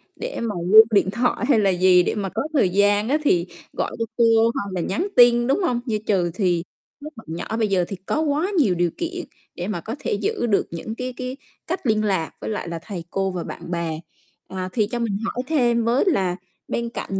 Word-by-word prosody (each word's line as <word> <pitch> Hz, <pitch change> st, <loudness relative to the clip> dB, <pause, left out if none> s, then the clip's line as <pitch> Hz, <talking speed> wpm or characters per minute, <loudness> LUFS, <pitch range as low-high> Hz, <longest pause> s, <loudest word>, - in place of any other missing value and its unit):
để -, -, -5 dB
mà 220 Hz, -4 st, -2 dB, 0.2 s
lưu 220 Hz, +1 st, +11 dB
điện 200 Hz, -2 st, +3 dB
thoại 240 Hz, +3 st, 0 dB
hay 235 Hz, -, +5 dB
là 200 Hz, -2 st, +3 dB
gì, 180 Hz, 0 st, +5 dB
để -, -, -1 dB
mà 195 Hz, -2 st, -2 dB
có 220 Hz, +4 st, -3 dB
thời 225 Hz, -11 st, +3 dB
gian 205 Hz, +3 st, +2 dB
á 290 Hz, -, +3 dB
thì 175 Hz, -10 st, +3 dB, 0.3 s
gọi -, -, -2 dB
cho 230 Hz, -, 0 dB
cô 235 Hz, -, +5 dB, 0.3 s
hoặc 200 Hz, -1 st, -4 dB
là 180 Hz, -, -1 dB
nhắn 205 Hz, -, -1 dB
tin, 240 Hz, 0 st, +6 dB
đúng 275 Hz, -, +2 dB
hông? 245 Hz, -8 st, +1 dB
Như 220 Hz, -3 st, 0 dB
chừ 180 Hz, -5 st, +1 dB
thì 175 Hz, -3 st, 0 dB, 0.4 s
các 305 Hz, +1 st, -8 dB
bạn 225 Hz, -, -12 dB
nhỏ 220 Hz, +5 st, -4 dB
bây 220 Hz, -2 st, +1 dB
giờ 185 Hz, -3 st, +1 dB
thì 195 Hz, -, -5 dB
có 310 Hz, -, 0 dB
quá 315 Hz, +6 st, 0 dB
nhiều 220 Hz, -, +3 dB
điều 175 Hz, -1 st, +1 dB
kiện 350 Hz, +1 st, -4 dB, 0.3 s
để 180 Hz, +2 st, -4 dB
mà 185 Hz, -6 st, -3 dB
có 225 Hz, -, -5 dB
thể -, -, -2 dB
giữ 205 Hz, +3 st, -1 dB
được 205 Hz, -3 st, +1 dB
những 170 Hz, +7 st, -6 dB
cái 250 Hz, +1 st, -4 dB
cái 255 Hz, +1 st, -5 dB, 0.3 s
cách 355 Hz, -4 st, -3 dB
liên 215 Hz, -1 st, +2 dB
lạc 190 Hz, -6 st, 0 dB
với -, -, -4 dB
lại 210 Hz, -5 st, -3 dB
là 170 Hz, -, -4 dB
thầy 190 Hz, -6 st, -6 dB
cô 195 Hz, 0 st, -1 dB
và 180 Hz, -2 st, -4 dB
bạn -, -, -8 dB
bè. 165 Hz, -2 st, -2 dB, 0.5 s
Ờ, 185 Hz, -1 st, -5 dB
thì 215 Hz, -4 st, +1 dB
cho 240 Hz, +2 st, -4 dB
mình 215 Hz, -4 st, -1 dB
hỏi 245 Hz, +2 st, -3 dB
thêm 240 Hz, -7 st, +2 dB
với 240 Hz, +4 st, +3 dB
là 190 Hz, -, +1 dB, 0.3 s
bên 235 Hz, 0 st, -2 dB
cạnh 195 Hz, -4 st, -4 dB
215 Hz, 235 wpm, -22 LUFS, 185-240 Hz, 0.5 s, lưu